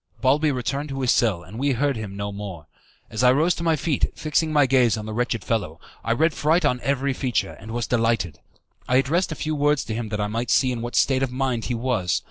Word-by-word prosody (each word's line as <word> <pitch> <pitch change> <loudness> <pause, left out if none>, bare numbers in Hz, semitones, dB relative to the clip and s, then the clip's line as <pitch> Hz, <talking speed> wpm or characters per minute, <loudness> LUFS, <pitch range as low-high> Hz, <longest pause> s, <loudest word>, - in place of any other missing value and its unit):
Balbi 145 +4 +3
returned 135 +3 -3
to 135 0 -4
his 125 - +3
cell, 100 -8 +2
and 105 +7 -9
we 140 0 +1
heard 140 +3 0
him 105 -3 -6
no 100 0 -3
more. 100 -6 -7 0.5
As 110 - -2
I 125 0 +6
rose 160 +7 +3
to 170 - -6
my 165 -1 +3
feet, 150 0 0
fixing 155 +1 0
my 145 -2 +4
gaze 125 -3 +3
on 105 - -5
the 110 - -5
wretched 120 -2 -1
fellow, 90 -8 -2 0.2
I 115 - -1
read 160 +6 +2
fright 160 +3 +2
on 125 -3 +2
every 140 0 0
feature, 130 -2 -1
and 110 - -11
was 120 0 -2
delighted. 115 -10 0 0.5
I 125 - +2
addressed 160 +8 +2
a - - -3
few 155 +1 -3
words 145 -1 +1
to 110 - -4
him 110 -1 -4
that 105 0 -3
I 105 - +1
might 115 +4 -3
see 130 -2 +3
in 120 -2 -3
what 120 +1 -5
state 135 -1 +3
of 135 -2 0
mind 125 -3 -1
he 125 - -2
was. 115 -9 0
125 Hz, 250 wpm, -23 LUFS, 110-140 Hz, 0.5 s, I